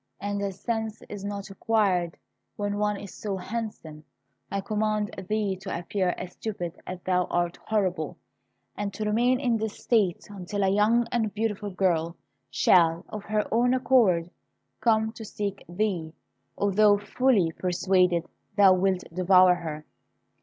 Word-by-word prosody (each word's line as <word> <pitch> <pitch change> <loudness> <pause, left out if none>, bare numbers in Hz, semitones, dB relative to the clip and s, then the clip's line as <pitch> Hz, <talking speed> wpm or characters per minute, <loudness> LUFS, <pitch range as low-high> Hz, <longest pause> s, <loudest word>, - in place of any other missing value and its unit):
And 205 0 -3
as 195 -1 -4
sense 225 -2 -3
is 205 -2 -7
not 200 0 -5
required 195 -5 +1 0.4
when 205 0 -2
one 210 -1 +1
is 200 -2 -9
so 200 -2 -4
handsome, 185 -7 -6 0.5
I 200 - -1
command 215 0 -1 0.2
thee 210 -2 0
to 190 +1 -5
appear 180 +1 -1
as 180 - -6
stupid 185 -6 -5
as 185 0 -5
thou 180 -1 +1
art 175 0 -1
horrible, 185 -8 -1 0.6
and 205 0 -3
to 215 - -3
remain 240 +4 +2
in 245 -4 +1
this 220 -1 -4
state 205 -7 +1
until 200 0 -4
a 190 - +3
young 215 +4 +3
and 225 -3 0
beautiful 210 -2 -2
girl 170 -3 0 0.3
shall, 165 +5 +3
of 210 -1 -7
her 215 -1 0
own 245 +2 +3
accord, 210 -10 +3 0.5
come 220 -1 +2
to 220 0 -10
seek 200 -2 -4
thee, 175 -4 -2 0.4
although 205 +1 +4
fully 210 -4 +2
persuaded 180 -1 +1 0.3
thou 195 -2 +7
wilt 185 0 +1
devour 185 0 +6
her. 155 -3 -6
200 Hz, 145 wpm, -27 LUFS, 180-215 Hz, 0.6 s, thou